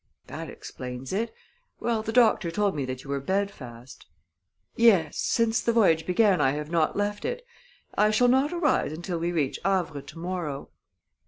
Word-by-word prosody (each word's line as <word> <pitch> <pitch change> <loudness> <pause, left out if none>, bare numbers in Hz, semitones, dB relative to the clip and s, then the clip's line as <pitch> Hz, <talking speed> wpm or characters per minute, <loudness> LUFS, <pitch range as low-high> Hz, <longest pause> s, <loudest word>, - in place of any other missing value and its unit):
"That - - -7
explains 125 +2 -7
it. 225 +3 -1 0.5
Well, 230 -2 0
the 220 - -4
doctor 220 -6 +4
told 205 +3 0
me 140 -3 -2
that 130 0 -6
you 140 - -12
were 140 - 0
bed 195 +7 0
fast." 125 -3 -12 0.7
"Yes 195 -10 +4
since 230 0 +1
the 235 - +1
voyage 165 -9 +3
began 190 +1 +3
I 135 - +3
have 150 +1 -5
not 165 +1 +1
left 205 0 -1
it. - - -4 0.5
I 210 - +4
shall 215 +3 +3
not 265 +4 +3
arise 340 - +1
until 170 +1 -4
we 170 +1 -1
reach 150 -6 -1
Havre 175 -6 0
to 155 - -13
morrow." 165 -5 -4
185 Hz, 175 wpm, -26 LUFS, 150-220 Hz, 0.7 s, doctor